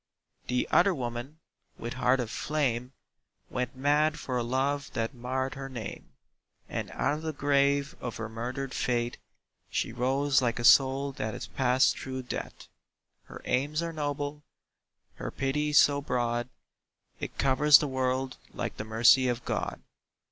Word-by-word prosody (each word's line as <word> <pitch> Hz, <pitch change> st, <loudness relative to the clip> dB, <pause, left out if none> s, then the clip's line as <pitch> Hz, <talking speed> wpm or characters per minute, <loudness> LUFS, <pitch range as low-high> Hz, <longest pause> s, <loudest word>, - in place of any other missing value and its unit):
The 125 Hz, 0 st, 0 dB
other 185 Hz, +1 st, +5 dB
woman, 120 Hz, +3 st, -5 dB, 0.4 s
with 120 Hz, +1 st, -5 dB
heart 130 Hz, +1 st, +2 dB
of 115 Hz, -3 st, -3 dB
flame, 130 Hz, -5 st, -1 dB, 0.6 s
Went 125 Hz, +1 st, -2 dB
mad 150 Hz, +3 st, +2 dB
for 130 Hz, -4 st, -4 dB
a 125 Hz, -, +1 dB
love 135 Hz, +4 st, -1 dB
that 115 Hz, +3 st, -2 dB
marred 130 Hz, +2 st, -2 dB
her 135 Hz, 0 st, -6 dB
name: 120 Hz, -6 st, -7 dB, 0.5 s
And -, -, -4 dB
out -, -, 0 dB
of 150 Hz, -, -4 dB
the 160 Hz, 0 st, -2 dB
grave 140 Hz, -1 st, +2 dB
of 120 Hz, -, -5 dB
her 115 Hz, -, -4 dB
murdered 125 Hz, +4 st, -4 dB
faith 120 Hz, -1 st, -1 dB, 0.5 s
She -, -, -1 dB
rose 135 Hz, +3 st, +2 dB
like 120 Hz, -2 st, 0 dB
a 120 Hz, -, -3 dB
soul 135 Hz, +3 st, +5 dB
that 110 Hz, -5 st, -4 dB
has -, -, -6 dB
passed 130 Hz, -1 st, +2 dB
through 130 Hz, 0 st, -5 dB
death. 125 Hz, -, -6 dB, 0.6 s
Her -, -, -11 dB
aims 145 Hz, +6 st, 0 dB
are 165 Hz, -1 st, -3 dB
noble, 145 Hz, -1 st, -3 dB, 0.8 s
her -, -, -4 dB
pity 150 Hz, +3 st, -1 dB
so 145 Hz, 0 st, +5 dB
broad, 120 Hz, -2 st, -1 dB, 0.7 s
It -, -, -6 dB
covers 140 Hz, +2 st, +6 dB
the 150 Hz, -, -2 dB
world 130 Hz, 0 st, -1 dB, 0.2 s
like -, -, -4 dB
the -, -, -3 dB
mercy 115 Hz, +4 st, +5 dB
of 120 Hz, -1 st, -2 dB
God. -, -, -3 dB
130 Hz, 155 wpm, -29 LUFS, 120-145 Hz, 0.8 s, covers